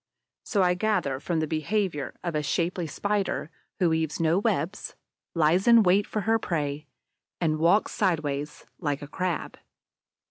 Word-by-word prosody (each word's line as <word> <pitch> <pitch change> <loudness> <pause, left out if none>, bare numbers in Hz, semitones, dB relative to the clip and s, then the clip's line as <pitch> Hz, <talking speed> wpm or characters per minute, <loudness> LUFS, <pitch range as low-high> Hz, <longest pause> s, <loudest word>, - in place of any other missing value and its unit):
So 200 -4 +1
I 180 0 +4
gather 180 -9 0
from 165 +2 -1
the 155 - -1
behavior 160 -1 -1
of 170 - -2
a 150 - 0
shapely 170 +4 -1
Spider 200 -3 -2 0.3
who 175 -3 +2
weaves 160 -1 -1
no 165 +2 +3
webs, 205 -3 -2 0.4
lies 165 +5 +3
in 235 -2 +8
wait 195 +2 +3
for 215 - -2
her 225 +3 +2
prey, 150 -5 -3 0.5
and 155 -3 0
walks 175 +6 +3
sideways, 150 -6 -1
like 145 -4 -2
a - - -7
Crab. 180 +1 -3
170 Hz, 150 wpm, -27 LUFS, 155-195 Hz, 0.5 s, in